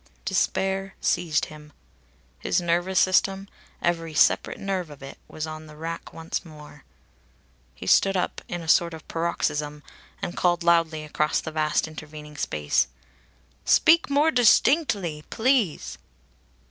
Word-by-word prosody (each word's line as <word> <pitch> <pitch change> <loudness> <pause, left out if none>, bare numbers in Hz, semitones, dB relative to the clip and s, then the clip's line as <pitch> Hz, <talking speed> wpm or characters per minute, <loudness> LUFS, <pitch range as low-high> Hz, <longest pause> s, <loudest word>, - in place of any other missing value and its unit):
Despair 195 0 0
seized 170 -3 +1
him. 150 -1 -13 0.7
His - - 0
nervous 175 +2 +1
system, 195 +1 +2 0.4
every 165 -2 -1
separate - - +3
nerve 190 -4 -3
of 145 -2 -12
it, 135 - -10
was 155 - -5
on 155 0 -8
the 150 - -13
rack 165 +2 -6
once 165 0 -5
more. 150 -3 -14 0.9
He - - -9
stood 195 -1 +4
up 180 - -2
in 175 -1 -5
a - - -10
sort 170 +1 +3
of 160 - -13
paroxysm 150 -3 -2 0.4
and 175 - -5
called 175 -1 +1
loudly 165 -2 +2
across 150 0 0
the 160 - -6
vast 155 0 0
intervening 150 -1 -10
space: 75 - 0 0.8
"Speak 330 0 +4
more 290 +3 +3
distinctly, 225 - +3
please." 220 - 0
165 Hz, 135 wpm, -25 LUFS, 155-190 Hz, 0.9 s, stood